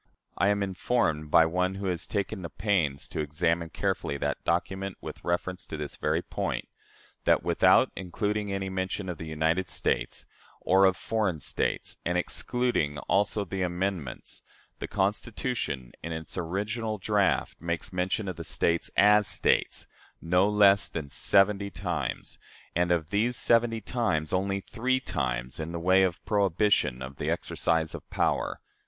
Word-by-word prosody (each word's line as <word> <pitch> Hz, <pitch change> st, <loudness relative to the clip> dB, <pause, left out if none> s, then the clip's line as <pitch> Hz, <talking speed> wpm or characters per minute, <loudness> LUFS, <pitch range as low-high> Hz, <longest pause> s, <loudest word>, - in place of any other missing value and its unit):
I 100 Hz, -, +2 dB
am 100 Hz, -1 st, +2 dB
informed, 95 Hz, -5 st, 0 dB
by 80 Hz, +1 st, +6 dB
one 90 Hz, +3 st, 0 dB
who 100 Hz, 0 st, -5 dB
has 90 Hz, -3 st, -2 dB
taken 100 Hz, 0 st, -2 dB
the 85 Hz, -, -5 dB
pains 85 Hz, -9 st, 0 dB
to -, -, -5 dB
examine 80 Hz, +3 st, 0 dB
carefully 70 Hz, -, -2 dB
that -, -, -2 dB
document 95 Hz, +2 st, -1 dB
with -, -, -8 dB
reference 90 Hz, +1 st, -2 dB
to 80 Hz, -, -5 dB
this 75 Hz, -1 st, -5 dB
very -, -, 0 dB
point, -, -, -3 dB, 0.6 s
that -, -, +4 dB
without -, -, +4 dB
including 105 Hz, +3 st, -2 dB
any 95 Hz, 0 st, -2 dB
mention 95 Hz, 0 st, -3 dB
of 85 Hz, -, -5 dB
"the 80 Hz, -, -6 dB
United 80 Hz, +3 st, 0 dB
States" 75 Hz, -, -1 dB, 0.3 s
or 95 Hz, +1 st, +4 dB
of 95 Hz, -1 st, +3 dB
"foreign 105 Hz, -8 st, -1 dB
states," -, -, -2 dB
and 90 Hz, +1 st, 0 dB
excluding 90 Hz, -6 st, -1 dB
also 100 Hz, +1 st, +1 dB
the 95 Hz, +1 st, -4 dB
amendments 90 Hz, -5 st, -3 dB, 0.4 s
the -, -, -4 dB
Constitution, 100 Hz, -, -2 dB
in 85 Hz, -, -5 dB
its 80 Hz, -2 st, -5 dB
original 105 Hz, +5 st, -2 dB
draft, 100 Hz, 0 st, +1 dB
makes 85 Hz, +3 st, -3 dB
mention 90 Hz, +3 st, -1 dB
of 95 Hz, -, -4 dB
the 85 Hz, -, -5 dB
States, 85 Hz, +1 st, 0 dB
as 105 Hz, 0 st, +6 dB
States, 80 Hz, -4 st, +1 dB, 0.3 s
no 90 Hz, +4 st, +3 dB
less 100 Hz, -1 st, +5 dB
than 75 Hz, -4 st, -5 dB
seventy 100 Hz, 0 st, +3 dB
times; 85 Hz, -7 st, -4 dB, 0.4 s
and 90 Hz, +1 st, +2 dB
of 85 Hz, -1 st, 0 dB
these 115 Hz, +5 st, +1 dB
seventy 115 Hz, -1 st, +2 dB
times, 95 Hz, -10 st, -1 dB
only 100 Hz, +1 st, 0 dB
three 130 Hz, +6 st, 0 dB
times 65 Hz, -, -3 dB
in 80 Hz, +1 st, -4 dB
the 85 Hz, -, -3 dB
way 95 Hz, +3 st, +4 dB
of 90 Hz, -3 st, 0 dB
prohibition 100 Hz, -, +2 dB
of 65 Hz, +1 st, -8 dB
the -, -, -2 dB
exercise 80 Hz, -1 st, 0 dB
of -, -, -6 dB
a -, -, -47 dB
power. -, -, 0 dB
95 Hz, 160 wpm, -28 LUFS, 80-100 Hz, 0.6 s, by